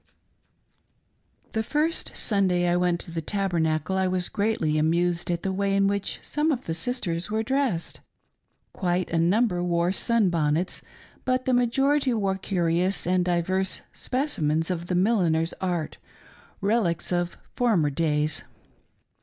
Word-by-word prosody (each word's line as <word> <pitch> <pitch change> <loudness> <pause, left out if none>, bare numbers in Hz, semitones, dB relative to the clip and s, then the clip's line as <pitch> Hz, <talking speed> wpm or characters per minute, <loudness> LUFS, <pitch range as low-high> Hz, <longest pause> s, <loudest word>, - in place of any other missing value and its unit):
The 220 - 0
first 300 +8 -1
Sunday 185 -4 +2
I 175 - +2
went 175 -1 +1
to - - -9
the 165 0 -3
Tabernacle 170 -3 0
I 190 0 +2
was 185 -1 0
greatly 200 -8 0
amused 170 +3 +1
at 170 -1 -1
the 190 - 0
way 195 +1 0
in 195 0 +3
which 200 0 -1
some 300 +2 0
of 260 -4 -2
the 165 - -2
sisters 175 -2 -2
were 220 +1 0
dressed. 260 -8 -1 0.7
Quite 180 -1 -1
a 165 - +1
number 180 +1 +2
wore 170 0 +1
sun 220 -1 +2
bonnets, 160 +2 0 0.4
but 255 0 0
the 260 - +2
majority 265 +2 +2
wore 195 -3 0
curious 180 0 0
and 180 0 +2
diverse 185 +2 0
Specimens 165 - -1
of 175 -1 -3
the 180 - -1
milliner's 175 -5 +2
art 175 -4 -2 0.3
— - - -27
relics 195 -6 +1
of 175 0 -1 0.2
•former 185 - +2
days. 150 -1 0
180 Hz, 145 wpm, -26 LUFS, 170-220 Hz, 0.7 s, in